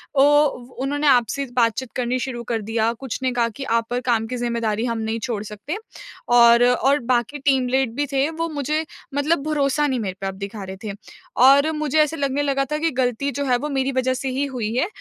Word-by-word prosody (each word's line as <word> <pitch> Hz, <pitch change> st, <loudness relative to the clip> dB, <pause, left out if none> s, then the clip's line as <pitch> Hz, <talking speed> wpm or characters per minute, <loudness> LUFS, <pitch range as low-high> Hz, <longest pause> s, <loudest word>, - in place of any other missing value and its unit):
औ 270 Hz, -, +5 dB
वो 280 Hz, -4 st, +1 dB
उन्होंने 290 Hz, +2 st, 0 dB
आपसे 265 Hz, +1 st, +3 dB
बातचीत 235 Hz, +1 st, +1 dB
करनी 250 Hz, 0 st, 0 dB
शुरू 245 Hz, -2 st, -4 dB
कर 225 Hz, -2 st, 0 dB
दिया। 225 Hz, +1 st, 0 dB
कुछ 265 Hz, -4 st, -4 dB
ने 255 Hz, -, +1 dB
कहा 235 Hz, -1 st, +1 dB
कि 275 Hz, -, -6 dB
आप 230 Hz, -3 st, 0 dB
पर 245 Hz, 0 st, -1 dB
काम 235 Hz, -3 st, +1 dB
की 250 Hz, -, -4 dB
ज़िम्मेदारी 235 Hz, -2 st, -1 dB
हम 230 Hz, -2 st, -1 dB
नहीं 220 Hz, +1 st, -2 dB
छोड़ 230 Hz, -2 st, -3 dB
सकते। 210 Hz, -, -6 dB, 0.6 s
और 235 Hz, 0 st, +7 dB
और 270 Hz, +3 st, +3 dB
बाकी 245 Hz, +4 st, 0 dB
टीम 265 Hz, -2 st, +2 dB
लीड 260 Hz, -2 st, +1 dB
भी 290 Hz, 0 st, 0 dB
थे 275 Hz, +2 st, +1 dB
वो 325 Hz, +1 st, -3 dB
मुझे 305 Hz, +1 st, -1 dB, 0.3 s
मतलब 290 Hz, +2 st, +1 dB
भरोसा 295 Hz, -1 st, +1 dB
नहीं 260 Hz, -3 st, -1 dB
मेरे 190 Hz, -4 st, -3 dB
पे 195 Hz, -, -2 dB
आप 195 Hz, -, -3 dB
दिखा 200 Hz, +1 st, -7 dB
रहे 190 Hz, 0 st, -7 dB
थे। 210 Hz, -, -4 dB, 0.5 s
और 280 Hz, +3 st, +6 dB
मुझे 305 Hz, 0 st, 0 dB
ऐसा 305 Hz, +1 st, 0 dB
लगने 280 Hz, 0 st, 0 dB
लगा 275 Hz, -1 st, 0 dB
था 300 Hz, -, +1 dB
कि 325 Hz, +1 st, 0 dB
गलती 255 Hz, +2 st, -1 dB
जो 285 Hz, 0 st, -3 dB
है 250 Hz, -2 st, +2 dB
वो 295 Hz, +4 st, -4 dB
मेरी 270 Hz, -1 st, 0 dB
वज़ह 260 Hz, 0 st, +1 dB
से 265 Hz, +1 st, -3 dB
ही 270 Hz, +2 st, -1 dB
हुई 235 Hz, -5 st, -3 dB
है 265 Hz, +9 st, +1 dB
255 Hz, 230 wpm, -22 LUFS, 235-280 Hz, 0.6 s, और